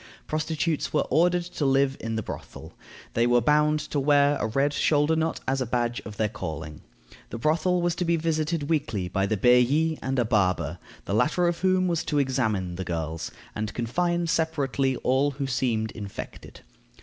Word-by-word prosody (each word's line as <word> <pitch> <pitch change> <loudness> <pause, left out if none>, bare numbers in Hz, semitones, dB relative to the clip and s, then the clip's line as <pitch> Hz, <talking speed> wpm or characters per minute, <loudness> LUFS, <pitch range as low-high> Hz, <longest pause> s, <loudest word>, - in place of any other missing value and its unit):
Prostitutes 155 0 -1
were 150 - +2
ordered 175 +2 +3
to 170 -3 -5
live 135 0 +3
in 115 0 -4
the 110 - -2
brothel. - - -9 0.4
They 115 +1 +2
were 120 0 +4
bound 150 +5 +3
to 145 - -3
wear 145 +1 +4
a 105 - 0
red 135 +6 +1
shoulder 150 +2 +2
knot 160 0 -1
as 135 0 0
a - - 0
badge 120 0 -1
of 105 -1 -8
their 110 - +1
calling. 80 -6 -6 0.5
The - - -5
brothel 165 +7 +1
was 175 -1 +1
to 180 - -1
be 170 0 +2
visited 160 -1 -1
weekly 115 - -1
by 95 +1 0
the 110 - 0
bailli 125 +8 +3
and 135 0 -2
a 120 - +2
"barber," 100 -5 +1 0.3
the - - -3
latter 150 - +2
of 170 0 -1
whom 185 0 +2
was 170 -2 0
to 150 - -1
examine 110 -10 0
the 95 - -3
girls, 80 -2 -4 0.2
and 105 0 -4
confine 170 +9 0
separately 140 -5 0
all 135 +3 +2
who 140 - -2
seemed 120 -4 -1
infected. 100 -3 -9
135 Hz, 185 wpm, -26 LUFS, 110-160 Hz, 0.5 s, were